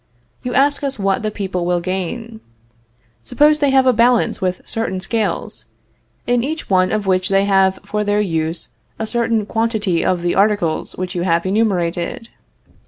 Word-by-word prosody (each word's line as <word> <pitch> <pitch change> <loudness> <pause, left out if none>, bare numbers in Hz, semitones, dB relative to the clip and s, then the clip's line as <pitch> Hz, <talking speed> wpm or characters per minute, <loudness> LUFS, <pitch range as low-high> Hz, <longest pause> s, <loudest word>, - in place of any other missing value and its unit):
You 250 - -4
ask 285 +2 +2
us 275 -2 -2
what 195 -1 0
the 215 - -1
people 190 -4 -3
will 175 0 +1
gain. 190 +6 -4 0.8
Suppose 295 - +3
they 285 -2 +3
have 265 -1 +4
a 255 - +5
balance 235 -1 +2
with 185 -1 -1
certain 225 -4 -2
scales, 220 +3 -2 0.6
in 245 -1 +1
each 315 -3 -4
one 185 -1 +3
of 215 -1 -1
which 185 -1 +1
they 195 0 +3
have 190 -1 +3
for 210 +1 -2
their 205 0 +1
use 165 -4 -2 0.3
a 220 - -3
certain 230 -2 0
quantity 220 -5 0
of 180 -2 0
the 175 - +1
articles 200 -5 +1
which 185 0 -4
you 175 - -2
have 170 -1 +1
enumerated. 185 0 -1
205 Hz, 170 wpm, -18 LUFS, 185-230 Hz, 0.8 s, a